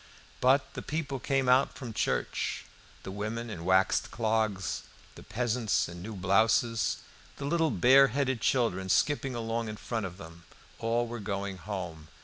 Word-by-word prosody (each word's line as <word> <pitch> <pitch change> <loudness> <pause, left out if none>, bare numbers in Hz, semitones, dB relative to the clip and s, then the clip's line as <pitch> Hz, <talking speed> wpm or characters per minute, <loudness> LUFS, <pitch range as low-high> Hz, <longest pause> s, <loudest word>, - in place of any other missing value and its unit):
But 135 +2 +3
the - - -5
people 145 -3 -3
came 135 0 0
out 130 +2 +4
from 120 -5 -6
church. - - -1 0.4
The 95 - -6
women 110 +3 -4
in 85 -5 -6
waxed 95 +1 +3
clogs, 110 -5 0 0.3
the - - -12
peasants 120 -1 0
in 85 0 -9
new 105 +3 -6
blouses, 110 +4 +2 0.4
the 140 - -5
little 165 +2 +2
bare 135 +1 +6
headed 130 -2 -1
children 95 -8 +1
skipping 135 +2 +2
along 115 -1 -2
in 105 - -6
front 110 -3 -3
of 90 0 -11
them, 85 -2 -12 0.3
all 115 +1 +1
were 120 0 -6
going 100 -1 -3
home. 90 -6 -6
115 Hz, 155 wpm, -30 LUFS, 100-125 Hz, 0.4 s, bare